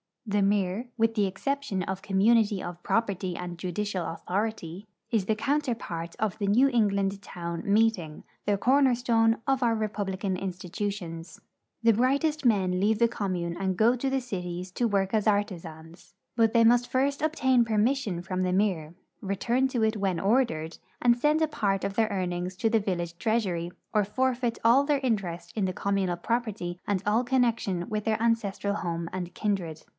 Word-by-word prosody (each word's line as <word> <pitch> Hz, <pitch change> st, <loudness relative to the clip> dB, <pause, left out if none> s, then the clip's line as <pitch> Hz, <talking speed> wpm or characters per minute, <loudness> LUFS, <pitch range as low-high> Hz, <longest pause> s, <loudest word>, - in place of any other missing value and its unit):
The 205 Hz, -1 st, +1 dB
mir, 200 Hz, +3 st, +1 dB
with 225 Hz, 0 st, +2 dB
the 210 Hz, -2 st, +3 dB
exception 210 Hz, 0 st, -2 dB
of 190 Hz, +1 st, -4 dB
community 205 Hz, +1 st, +3 dB
of 175 Hz, 0 st, -7 dB
property 195 Hz, -5 st, -1 dB
and 175 Hz, -1 st, -6 dB
judicial 185 Hz, +1 st, -3 dB
authority, 195 Hz, +1 st, -3 dB, 0.2 s
is 220 Hz, -5 st, +1 dB
the 220 Hz, -, +1 dB
counterpart 230 Hz, -, -2 dB
of 215 Hz, -3 st, -1 dB
the 200 Hz, -, -1 dB
New 245 Hz, +7 st, +5 dB
England 200 Hz, -5 st, +1 dB
town 170 Hz, -3 st, -6 dB
meeting, 200 Hz, -7 st, +1 dB, 0.2 s
the 205 Hz, -1 st, +2 dB
corner 260 Hz, +3 st, +4 dB
stone 225 Hz, -2 st, +2 dB
of 270 Hz, -1 st, +1 dB
our 235 Hz, -2 st, +2 dB
republican 200 Hz, -3 st, -2 dB
institutions. 180 Hz, -2 st, -5 dB, 0.4 s
The 230 Hz, -, +6 dB
brightest 280 Hz, +6 st, +1 dB
men 190 Hz, -6 st, +2 dB
leave 210 Hz, +3 st, +2 dB
the 235 Hz, +1 st, +3 dB
commune 180 Hz, -6 st, -3 dB
and 190 Hz, -1 st, 0 dB
go 230 Hz, +5 st, +4 dB
to 270 Hz, +3 st, -1 dB
the 270 Hz, 0 st, 0 dB
cities 180 Hz, -5 st, -5 dB
to 240 Hz, -, +1 dB
work 195 Hz, -2 st, 0 dB
as 215 Hz, -1 st, +1 dB
artisans, 170 Hz, -5 st, -3 dB, 0.2 s
but 225 Hz, -1 st, +3 dB
they 230 Hz, -, +5 dB
must 245 Hz, +2 st, +4 dB
first 275 Hz, +2 st, 0 dB
obtain 260 Hz, -6 st, +3 dB
permission 220 Hz, -3 st, 0 dB
from 185 Hz, 0 st, -2 dB
the 180 Hz, 0 st, 0 dB
mir, 180 Hz, -5 st, 0 dB, 0.3 s
return 235 Hz, +7 st, 0 dB
to 245 Hz, -4 st, -1 dB
it 220 Hz, 0 st, +1 dB
when 190 Hz, -4 st, 0 dB
ordered, 195 Hz, -7 st, +1 dB, 0.2 s
and 240 Hz, -1 st, +4 dB
send 300 Hz, +5 st, +2 dB
a 315 Hz, -, +3 dB
part 200 Hz, -9 st, -1 dB
of 200 Hz, -, -2 dB
their 225 Hz, 0 st, +3 dB
earnings 180 Hz, -2 st, -3 dB
to 225 Hz, -, +1 dB
the 225 Hz, 0 st, +3 dB
village 175 Hz, -4 st, -3 dB
treasury 195 Hz, -7 st, 0 dB, 0.2 s
or 210 Hz, -, +3 dB
forfeit 245 Hz, +2 st, 0 dB
all 240 Hz, +5 st, +6 dB
their 290 Hz, -1 st, +2 dB
interest 175 Hz, -8 st, -2 dB
in 210 Hz, -3 st, 0 dB
the 185 Hz, -, -1 dB
com 200 Hz, +2 st, -1 dB
munal 180 Hz, -3 st, -1 dB
property 215 Hz, -7 st, -2 dB
and 200 Hz, -2 st, 0 dB
all 215 Hz, +4 st, +2 dB
connection 230 Hz, -8 st, 0 dB
with 210 Hz, -1 st, -2 dB
their 220 Hz, -1 st, 0 dB
ancestral 205 Hz, -3 st, 0 dB
home 170 Hz, -2 st, -3 dB
and 180 Hz, -1 st, -5 dB
kindred. 180 Hz, -7 st, -2 dB
205 Hz, 175 wpm, -27 LUFS, 185-235 Hz, 0.4 s, The